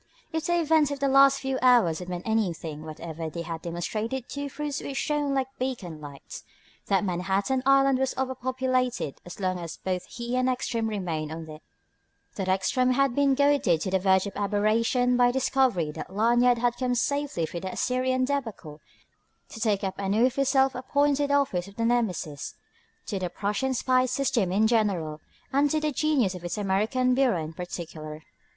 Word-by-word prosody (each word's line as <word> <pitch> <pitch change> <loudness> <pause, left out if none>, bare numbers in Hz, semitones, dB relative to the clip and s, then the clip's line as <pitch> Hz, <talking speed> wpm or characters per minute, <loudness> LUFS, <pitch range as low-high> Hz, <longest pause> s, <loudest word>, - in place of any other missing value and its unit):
If 320 0 -2
the 345 0 +2
events 315 -2 +3
of 285 -1 -4
the 280 - +1
last 275 0 +5
few 265 -1 -2
hours 240 -11 +4
had 180 0 -7
meant 180 +2 -5
anything 170 -8 -1
whatever 160 +1 -6
they 170 +2 -5
had 165 -1 -5
demonstrated 215 +9 -3
two 285 0 -5
truths 290 0 -4
which 275 - -5
shone 290 -2 0
like 265 0 -2
beacon 210 -12 -4
lights: 140 -2 -10 0.4
that 195 0 +2
Manhattan 195 +7 0
Island 275 -1 +5
was 265 -1 -1
overpopulated 255 - -1
as 175 - -9
long 185 -2 -1
as 170 -1 -7
both 185 -1 -3
he 240 +1 -5
and 255 0 +2
Ekstrom 235 -3 -1
remained 170 -8 -3
on 160 0 -7
it; 155 0 -10 0.7
that 190 -2 -4
Ekstrom 250 +7 +2
had 275 -1 +2
been 280 0 +3
goaded 280 - +3
to 185 - -2
the 190 - +2
verge 190 0 +3
of 200 - -6
aberration 220 +5 +1
by 245 0 +5
the 245 - +1
discovery 255 - +1
that 155 +3 -8
Lanyard 240 +4 +3
had 240 0 0
come 250 -1 0
safely 280 - 0
through 170 - -6
the 190 +1 -5
Assyrian 255 0 0
débâcle 225 - -4 0.7
to - - -9
take 210 -3 +1
up 190 0 -3
anew 210 +6 +2
his 275 +1 0
self 265 0 +3
appointed 285 +2 +1
office 275 -11 +1
of 200 - -14
Nemesis 225 -11 -1 0.5
to 200 - -3
the 180 -1 -2
Prussian 210 +9 -1
spy 255 +1 +2
system 240 -7 0
in 205 +4 +3
general 195 -9 0 0.3
and 285 +2 +3
to 310 - +1
the 305 0 -1
genius 275 -8 +1
of 180 -1 -9
its 175 +2 -4
American 215 +6 +1
bureau 250 -10 +2
in 155 +1 -7
particular. 160 -3 -7
230 Hz, 180 wpm, -27 LUFS, 180-265 Hz, 0.7 s, last